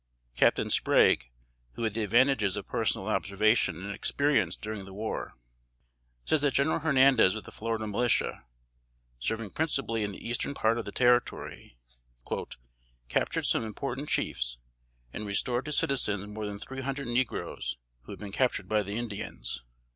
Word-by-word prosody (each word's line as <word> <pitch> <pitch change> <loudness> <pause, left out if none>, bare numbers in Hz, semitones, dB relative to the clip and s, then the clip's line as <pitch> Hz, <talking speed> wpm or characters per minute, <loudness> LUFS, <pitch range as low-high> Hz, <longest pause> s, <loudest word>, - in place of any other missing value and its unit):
Captain - - +3
Sprague, - - +4 0.4
who 115 - -5
had 110 -2 0
the 115 - -1
advantages 110 -2 +3
of 100 - -4
personal - - -1
observation 100 -3 +2
and 100 0 -4
experience 110 - +1
during 105 -2 -6
the 95 0 -11
war, 110 +2 -4 0.9
says 155 - +2
that 145 -2 +1
General 140 +4 +3
Hernandez 135 -9 +5
of 110 - -5
the - - -11
Florida 115 0 -3
Militia, 115 +3 0 0.8
serving 110 - -2
principally 135 -8 0
in 105 -1 -1
the - - -8
eastern 120 +4 -1
part 115 -1 +2
of 115 - -4
the 100 - -5
Territory, 120 - +1 1.3
"captured - - 0
some - - +2
important 135 +6 -4
chiefs, - - -1 0.6
and 105 - -5
restored 120 +5 0
to 150 - -4
citizens 115 -9 0
more 105 +1 -5
than 100 -1 -5
three 135 +6 -7
hundred 135 0 -3
negroes 120 - -1 0.3
who - - -9
had - - -7
been 100 -2 -7
captured 125 +4 +1
by 110 -1 +2
the 100 +1 -4
Indians." 105 - -4
110 Hz, 155 wpm, -29 LUFS, 100-130 Hz, 1.3 s, Hernandez